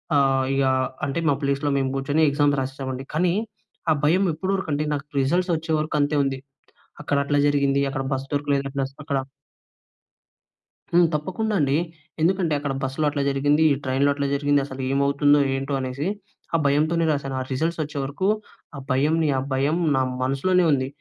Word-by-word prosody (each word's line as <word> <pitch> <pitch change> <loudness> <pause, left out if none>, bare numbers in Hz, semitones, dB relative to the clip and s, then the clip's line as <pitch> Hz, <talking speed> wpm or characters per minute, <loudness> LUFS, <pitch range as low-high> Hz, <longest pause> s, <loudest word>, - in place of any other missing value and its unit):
ఆహ్, 135 -2 +3
ఇగా 135 -1 +2 0.4
అంటే 140 +4 -2
మా - - +4
ప్లేస్‌లో 140 +1 0
మేము 135 -1 0
కూర్చొని 145 +3 0
ఎగ్జామ్స్ 145 0 +2
రాసేసాం 135 0 -4
అండి. 130 - -6
కానీ 175 +2 +2 0.6
ఆ - - +6
భయం 175 +6 +3
ఎప్పటి 185 +5 -3
వరకు 190 -4 -4
అంటే, 145 +1 0
నాకు 140 0 -3
రిజల్ట్ 175 +7 +1
వచ్చేవరకు 155 -1 -1
అంతే 145 +1 +1
ఉంది. 135 -1 -2 0.6
అక్కడ 145 -1 0
అట్లా 145 0 +1
జరిగింది, 140 -1 +2
అక్కడ 135 0 -3
బస్ 135 0 -3
దొరకలేదు. 140 -1 0
ప్లస్ 135 0 -2
అక్కడ 140 -2 -1 1.7
హ్మ్. 175 0 +5
తప్పకుండా 185 +9 -2
అండి. 140 0 +2 0.4
ఎందుకంటే, 175 -1 +2
అక్కడ 140 -1 -3
బస్సులో 135 +3 -1
అట్లా 145 -1 -2
జరిగింది. 145 +3 +2
ఈ - - 0
ట్రైన్‌లో 135 +2 +2
అట్లా 140 0 -2
జరిగింది. 145 0 +2
అసలు 135 -1 -7
ఏమవుతుందో? 140 +1 +3 0.2
ఏంటో? 135 +1 -3
అనేసి, 130 +5 -3 0.5
ఆ - - +5
భయంతోనే 155 +4 +2
రాసాను. 140 -2 -2
ఆ - - -2
రిజల్ట్స్ 160 +5 -1
వచ్చేవరకు 145 +4 -3 0.5
ఆ - - -5
భయంని, 155 +4 +2
ఆ - - +1
భయం 140 +5 +1 0.2
నా 130 - +2 0.2
మనసులోనే 175 +8 +2
ఉంది. 130 -2 +1
145 Hz, 165 wpm, -23 LUFS, 135-155 Hz, 1.7 s, ఆ